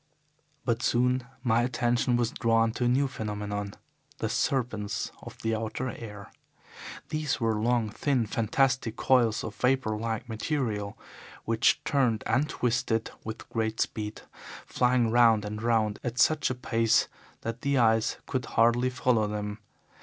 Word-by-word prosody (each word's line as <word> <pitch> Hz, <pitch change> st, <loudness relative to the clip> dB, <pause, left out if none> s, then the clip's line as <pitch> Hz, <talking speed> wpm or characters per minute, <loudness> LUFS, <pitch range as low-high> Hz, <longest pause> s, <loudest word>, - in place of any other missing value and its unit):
"But 115 Hz, -1 st, 0 dB
soon 125 Hz, 0 st, +1 dB, 0.2 s
my 120 Hz, -2 st, +3 dB
attention 120 Hz, 0 st, +1 dB
was 120 Hz, -1 st, 0 dB
drawn 115 Hz, -1 st, +2 dB
to 120 Hz, -, -2 dB
a -, -, +3 dB
new 135 Hz, +3 st, +3 dB
phenomenon 105 Hz, -4 st, -4 dB, 0.4 s
the -, -, -2 dB
serpents 115 Hz, -6 st, -1 dB
of -, -, -10 dB
the 115 Hz, 0 st, +1 dB
outer 110 Hz, +3 st, -3 dB
air. 105 Hz, -3 st, -9 dB, 0.8 s
These 155 Hz, -2 st, -1 dB
were 115 Hz, -2 st, +1 dB
long, 120 Hz, -1 st, +1 dB
thin, 130 Hz, 0 st, 0 dB
fantastic 115 Hz, +2 st, +1 dB
coils 120 Hz, -4 st, +2 dB
of 110 Hz, -, -5 dB
vapour 125 Hz, -3 st, +1 dB
like 115 Hz, +1 st, -3 dB
material, 110 Hz, -4 st, -2 dB, 0.5 s
which 115 Hz, 0 st, +2 dB
turned 125 Hz, -6 st, +1 dB
and 145 Hz, +4 st, +1 dB
twisted 115 Hz, -2 st, 0 dB
with 110 Hz, 0 st, -7 dB
great 110 Hz, -2 st, -2 dB
speed, 105 Hz, -1 st, -3 dB, 0.4 s
flying 125 Hz, -2 st, +2 dB
round 115 Hz, -3 st, +5 dB
and 105 Hz, +1 st, -5 dB
round 110 Hz, -3 st, +1 dB
at 120 Hz, -1 st, -3 dB
such 155 Hz, +4 st, +3 dB
a 130 Hz, -, -2 dB
pace 115 Hz, -2 st, +2 dB, 0.3 s
that 115 Hz, +1 st, -5 dB
the 140 Hz, -1 st, +1 dB
eyes 115 Hz, -2 st, +3 dB
could 130 Hz, -2 st, -2 dB
hardly 120 Hz, +2 st, +3 dB
follow 125 Hz, -4 st, +1 dB
them. 105 Hz, 0 st, -4 dB
115 Hz, 145 wpm, -28 LUFS, 110-125 Hz, 0.8 s, round